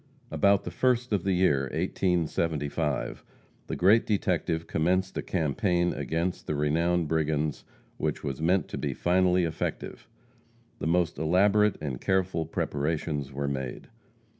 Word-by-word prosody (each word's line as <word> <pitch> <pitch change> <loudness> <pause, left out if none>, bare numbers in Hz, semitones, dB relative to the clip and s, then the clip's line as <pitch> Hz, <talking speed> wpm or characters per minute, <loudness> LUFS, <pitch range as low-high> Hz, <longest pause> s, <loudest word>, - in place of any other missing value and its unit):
About 100 -1 +3
the - - -5
first 125 -2 +1
of 100 -4 +1
the 95 - +1
year 70 -8 +2
1875, 80 -5 -1 0.4
the - - -3
great 105 +6 +5
detective 85 -5 0
commenced 90 +4 0
a - - -1
campaign 85 +2 0
against 85 +3 -2
the 75 - -1
renowned 85 +3 +1
brigands 75 -1 -1 0.3
which - - -2
was 70 0 -4
meant 90 +4 +2
to - - -5
be - - -2
finally 90 0 +2
effective. 80 -1 -4 0.7
The - - -2
most 85 -3 +1
elaborate 100 +6 +3
and 70 -5 -4
careful 95 -4 0
preparations 75 -2 -2
were 70 +1 -3
made. 65 -3 -4
85 Hz, 135 wpm, -28 LUFS, 75-95 Hz, 0.7 s, great